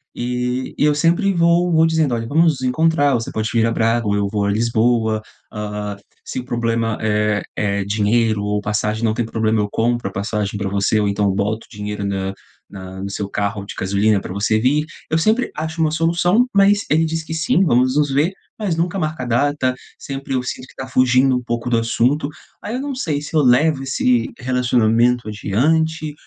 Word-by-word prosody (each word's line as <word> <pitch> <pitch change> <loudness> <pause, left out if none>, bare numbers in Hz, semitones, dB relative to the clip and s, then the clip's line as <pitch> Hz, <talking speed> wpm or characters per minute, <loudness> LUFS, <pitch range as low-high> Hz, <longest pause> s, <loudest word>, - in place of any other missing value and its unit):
E 125 +1 -3
e - - +2
eu 150 - +4
sempre 170 +6 +2
vou 170 +1 +3
vou 160 0 +4
dizendo 160 -5 +1
olha, 115 -1 -2
vamos 155 +1 +2
encontrar, 145 +2 +2
você 115 -1 -3
pode 110 0 -2
vir 115 -1 +2
a 115 - +1
Braga 115 +1 +1
ou 100 - +1
eu 100 -1 0
vou 105 -1 0
a 100 - +1
Lisboa, 110 0 +1 0.3
ah, 105 -1 -5 0.3
se - - -5
o 125 - -7
problema 115 -2 -1
é 105 -1 +1
é 100 -1 -1
dinheiro 105 +1 +1
ou 105 0 -1
passagem, 105 +2 -1
não 110 -2 +2
tem 120 - -1
problema, 110 -1 0
eu 105 0 0
compro 120 -1 0
a - - -5
passagem 100 +1 -3
para 100 -1 -2
você, 100 +2 +1
ou 105 - +1
então 100 +1 0
eu 100 - +3
boto 105 +3 -2
o 115 - -16
dinheiro 105 0 -4
na 95 -1 -2 0.4
na 95 -1 -9
no 100 - -4
seu 100 0 -4
carro 100 0 -2
de - - -8
gasolina 100 +2 +2
para - - -7
você 105 +2 +1
vir," 145 +6 +2 0.2
eu 160 - +1
sempre 220 +9 +1
acho 160 +1 -4
uma 155 -1 +2
solução, 175 +8 +2
mas 200 +1 +4
ele 160 +2 +3
diz 160 0 -2
que 160 - -10
sim, 160 +3 +2
vamos 130 -2 +2
nos 150 -1 +2
ver, 145 +6 +2 0.3
mas 200 -6 -1
nunca 175 +3 -1
marca 155 -5 -2
a - - -4
data 130 +1 +1 0.2
sempre 135 0 -5
eu 130 - +1
sinto 125 +1 -6
que - - -18
tá 130 - -6
fugindo 130 +1 +3
um 125 - -5
pouco 120 0 -3
do 115 - +3
assunto. 125 +6 +1 0.3
Aí 210 - -4
eu 255 - -3
não 285 0 -3
sei 160 - -1
se 150 - -9
eu 155 - +5
levo 140 +3 +3
esse 125 -3 +1
relacionamento 125 -2 +2
adiante 155 +10 0
120 Hz, 210 wpm, -19 LUFS, 105-155 Hz, 0.4 s, eu